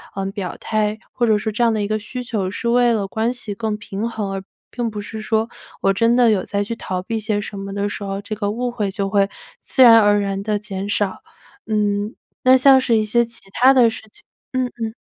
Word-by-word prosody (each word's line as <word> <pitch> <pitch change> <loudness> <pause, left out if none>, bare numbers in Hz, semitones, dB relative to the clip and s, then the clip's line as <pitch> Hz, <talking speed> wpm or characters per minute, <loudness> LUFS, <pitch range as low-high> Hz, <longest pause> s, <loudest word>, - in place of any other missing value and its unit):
嗯， 195 0 -3
表 195 -3 -5
态， 215 -1 -1
或 240 - 0
者 215 -1 +4
说 215 +1 -2
这 220 - -3
样 230 -1 +4
的 215 - -1
一 205 - -1
个 215 0 0
需 250 +4 -6
求 215 -6 -2
是 235 +4 -3
为 240 0 +4
了 200 -3 -1
关 225 +4 0
系 235 -4 -4
更 215 +1 -2
平 205 +1 -4
衡， 215 -4 -4
而 195 -1 -4 0.3
并 240 -2 -2
不 210 -1 -6
是 220 +2 -7
说， 220 +1 0 0.3
我 195 - +3
真 230 +4 +3
的 245 -2 +5
有 195 -4 0
在 200 0 -1
去 230 +3 -4
逃 185 -4 -3
避 225 +3 -3
些 215 -1 -1
什 205 -1 -7
么 195 0 -6
的 200 0 -1
时 205 - -5
候， 195 0 -4
这 210 +2 -6
个 205 -1 -2
误 245 +3 -2
会 215 -4 -2
就 195 0 -2
会 200 -1 +2 0.3
自 260 - +3
然 230 -2 +9
而 205 -1 +4
然 195 -1 -2
地 210 0 0
减 200 -2 -5
少。 205 -1 -1 0.5
嗯， 210 0 0 0.3
那 255 0 +8
像 265 +1 +7
是 250 -3 +2
一 215 - +3
些 235 +3 +2
其 230 - -8
他 255 +6 +5
的 245 -3 +5
事 225 - -7
情 - - -12 0.3
嗯 255 -1 +1
嗯。 220 -1 -2
215 Hz, 265 characters per minute, -20 LUFS, 200-235 Hz, 0.5 s, 然